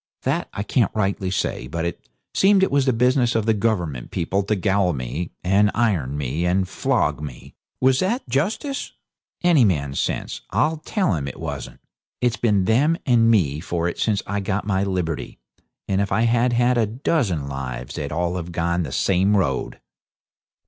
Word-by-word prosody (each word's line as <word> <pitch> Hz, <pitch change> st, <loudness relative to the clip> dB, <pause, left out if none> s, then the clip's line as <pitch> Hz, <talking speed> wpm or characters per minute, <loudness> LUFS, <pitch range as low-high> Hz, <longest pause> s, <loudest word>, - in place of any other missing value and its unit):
That -, -, -1 dB
I 100 Hz, -, -4 dB
can't 115 Hz, -2 st, +2 dB
rightly 100 Hz, -2 st, 0 dB
say, 65 Hz, -8 st, -2 dB
but 80 Hz, +4 st, -3 dB
it 85 Hz, -7 st, -5 dB, 0.2 s
seemed 195 Hz, 0 st, +4 dB
it -, -, +2 dB
was 140 Hz, -1 st, +2 dB
the -, -, +5 dB
business 125 Hz, +1 st, +2 dB
of 110 Hz, -2 st, +1 dB
the 110 Hz, -, +3 dB
Government 90 Hz, -, -1 dB
people 95 Hz, +4 st, -1 dB
to 100 Hz, +2 st, 0 dB
gaol 95 Hz, -2 st, +1 dB
me, 70 Hz, +6 st, -4 dB
and 100 Hz, +3 st, +4 dB
iron 90 Hz, -, +1 dB
me, 75 Hz, +4 st, -2 dB
and 90 Hz, +2 st, +1 dB
flog 90 Hz, -, 0 dB
me. 70 Hz, -5 st, -9 dB, 0.3 s
Was 130 Hz, 0 st, +3 dB
that 230 Hz, +8 st, -1 dB
justice? 205 Hz, -, -2 dB, 0.5 s
Any 170 Hz, -7 st, +5 dB
man's 70 Hz, -9 st, 0 dB
sense -, -, -2 dB
'll 150 Hz, -, +1 dB
tell 195 Hz, -, 0 dB
him 70 Hz, -4 st, -2 dB
it 65 Hz, -, -7 dB
wasn't. -, -, -6 dB, 0.4 s
It's 125 Hz, -1 st, +1 dB
been 105 Hz, -6 st, +2 dB
them 145 Hz, -, +3 dB
and 115 Hz, -3 st, +4 dB
me 80 Hz, -10 st, +2 dB
for 85 Hz, +1 st, -2 dB
it 85 Hz, -, -4 dB
since 110 Hz, -2 st, +1 dB
I 100 Hz, 0 st, -2 dB
got 100 Hz, 0 st, -2 dB
my 100 Hz, -2 st, +1 dB
liberty, 90 Hz, -5 st, -3 dB, 0.5 s
and 95 Hz, 0 st, +1 dB
if 100 Hz, -, -2 dB
I 95 Hz, +3 st, +2 dB
had 120 Hz, +1 st, +2 dB
had 120 Hz, +1 st, +3 dB
a 110 Hz, -, +2 dB
dozen 110 Hz, -, -1 dB
lives 65 Hz, -2 st, -5 dB
they'd 70 Hz, -1 st, -4 dB
all 85 Hz, +3 st, -1 dB
have 85 Hz, 0 st, -5 dB
gone 85 Hz, +1 st, 0 dB
the 75 Hz, -6 st, -4 dB
same 95 Hz, +6 st, +2 dB
road!' 70 Hz, -9 st, -1 dB
100 Hz, 185 wpm, -22 LUFS, 85-120 Hz, 0.5 s, the